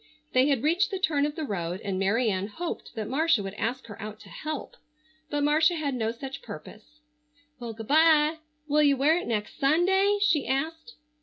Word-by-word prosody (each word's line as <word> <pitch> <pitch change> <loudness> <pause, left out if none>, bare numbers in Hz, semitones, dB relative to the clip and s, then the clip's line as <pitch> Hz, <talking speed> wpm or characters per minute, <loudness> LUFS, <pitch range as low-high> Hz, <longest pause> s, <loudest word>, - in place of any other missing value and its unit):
They 255 +2 +4
had 275 -5 +1
reached 340 +8 +2
the 390 - -3
turn 300 -6 +1
of 295 - -6
the 320 - -4
road 180 - -3
and 195 -2 -3
Mary 220 +4 +2
Ann 190 +1 -2
hoped 335 +11 -6
that 215 -2 -3
Marcia 275 -3 +2
would 195 0 -5
ask 240 +5 -3
her 215 -1 -10
out 215 +1 -7
to - - -14
"help," 310 -2 -6 0.5
but 290 -1 -1
Marcia 315 +4 +4
had 295 -4 -2
no 225 -3 -1
such 265 +3 -7
purpose. 305 -10 -11 0.6
"Well, 235 -2 -6
good 225 0 -9
bye! 310 0 +5 0.3
Will 300 +1 +3
you 285 -2 +4
wear 295 +5 +4
it - - -7
next 210 -3 -3
Sunday?" 380 +8 +3
she 345 -8 +2
asked. 320 - -3
285 Hz, 200 wpm, -27 LUFS, 225-320 Hz, 0.6 s, bye